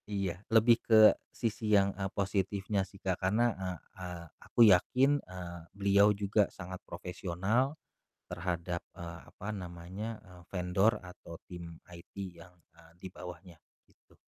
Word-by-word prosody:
Iya, 95 -3 -2
lebih 115 +1 +5
ke 110 -1 +7 0.2
sisi 115 -1 -3
yang, 100 0 +3
e 95 0 -3
positifnya 100 0 0
sih 100 - -15
Kak, 95 -2 -2
karena, 110 +5 +2
eee 95 -2 -4 0.2
eee, 90 -2 -6 0.2
aku - - -7
yakin, 135 +10 +3
eee, 90 -1 -8 0.2
beliau 100 +1 +5
juga 100 +1 +3
sangat 90 0 -7
profesional 95 - -1 0.5
terhadap, 85 0 -2 0.2
eee, 85 -1 -7
apa 100 - -6
namanya, 95 +3 -6
eee, 90 -2 -15
vendor 95 +5 +2
atau 90 -2 -11 0.2
tim 85 -2 -9
IT 85 -1 -13 0.2
yang, 90 +2 -14 0.2
eee, 80 0 -18
di 95 - -5
bawahnya, 90 -1 -10 0.3
gitu. - - -28
95 Hz, 140 wpm, -32 LUFS, 90-105 Hz, 0.5 s, ke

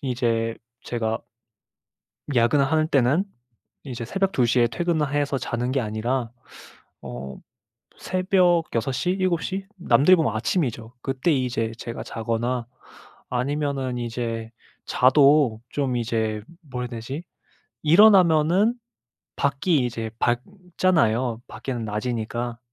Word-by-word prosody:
이제 115 -4 -1 0.3
제가 115 -2 -2 1.2
야근을 125 +4 +4
하는 155 -1 +2
때는 140 +6 +3 0.6
이제 125 -4 -5
새벽 195 - -1
2 125 -9 +2
시에 120 0 +3
퇴근을 155 +3 -1
해서 145 -1 0
자는 120 0 -2
게 135 - +1
아니라 115 +2 -2 0.7
어 65 +2 -7 0.6
새벽 185 -2 +2
6 115 +3 0
시, 180 - -1
7 185 -3 0
시? 195 +1 -4
남들이 170 +1 +5
보면 150 -10 0
아침이죠. 115 - -1
그때 135 +5 0
이제 125 -5 0
제가 115 - -6
자거나 115 +2 -2 0.6
아니면은 135 0 -1
이제 115 -1 -4 0.4
자도 135 -3 +4
좀 135 -4 -1
이제 110 -2 -1 0.3
뭐라 125 -1 -3
그래야 120 -2 -6
되지? 135 +8 -6 0.6
일어나면은 180 +2 +5 0.6
밖이 140 0 +1
이제 115 -2 -4
밝잖아요, 130 - 0
밖에는 125 -4 -5
낮이니까. 115 +2 -3
125 Hz, 235 characters per minute, -24 LUFS, 115-155 Hz, 1.2 s, 남들이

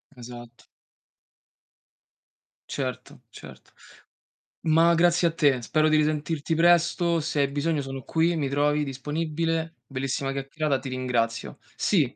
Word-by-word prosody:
Esatto. 120 -1 -11 2.0
Certo, 130 -3 -5
certo. - - -13 0.9
Ma 165 +2 +5
grazie 175 +1 +3
a 165 - 0
te, 145 -6 +2
spero 155 +6 +1
di 155 - +4
risentirti 155 +1 0
presto. 170 0 +3
Se 155 -1 -2
hai 140 - +3
bisogno 145 +2 -1
sono 135 0 -6
qui, 165 +1 +1
mi 145 -4 -1
trovi 145 +2 +1
disponibile. 160 +4 -2
Bellissima 135 0 -3
chiaccherata, 140 +1 -2
ti 130 0 -7
ringrazio, 120 -3 -2 0.2
sì. - - +1
150 Hz, 120 wpm, -26 LUFS, 135-165 Hz, 2.0 s, Ma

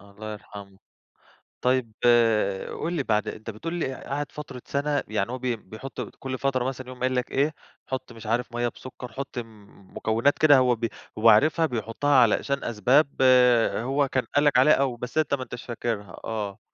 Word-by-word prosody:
الله 100 +2 -9
يرحمه، 100 -2 -11 0.8
طيب 125 -2 +1 0.9
قُل 170 +2 -2
لي 145 -5 -1
بعد 105 -3 0
أنت 110 +1 -6
بتقُول 135 +11 -5
لي 145 -6 -2
قعد 145 +2 -5
فترة 140 -4 -8
سَنة، 145 +1 -1
يعني 110 +2 -1
هو 130 - -3
بي 125 -1 -1
بيحط 110 +5 -8 0.2
كُلّ 130 -1 -4
فترة 130 -2 0
مثلًا 130 0 -4
يقوم 125 0 -10
قايل 130 0 0
لك 125 - -2
إيه، 145 +3 +1 0.3
حُط 130 -1 -5
مش 115 -1 -12
عارف 120 +1 -1
مَيّة 120 0 0
بسكر، 125 0 -9
حُط 135 +2 -7 0.6
مكونات 115 +6 +1
كده 145 -3 +7
هو 125 -1 +3
ب 115 0 -2 0.3
هو 115 +1 +6
عارفها 155 +9 +5
بيحطها 125 +3 -1
علشان 130 +3 +3
أسباب 125 +7 +3 0.7
هو 135 +4 0
كان 130 -1 -1
قال 145 +1 +4
لك 145 - +4
عليها 150 +4 +6
أو 135 -3 +1
بس 125 +6 -7
أنت 155 -2 +1
ما 130 -2 0
انتاش 125 -1 -8
فاكرها 115 -5 -4
آه. 105 -3 -4
125 Hz, 180 wpm, -25 LUFS, 115-140 Hz, 0.9 s, كده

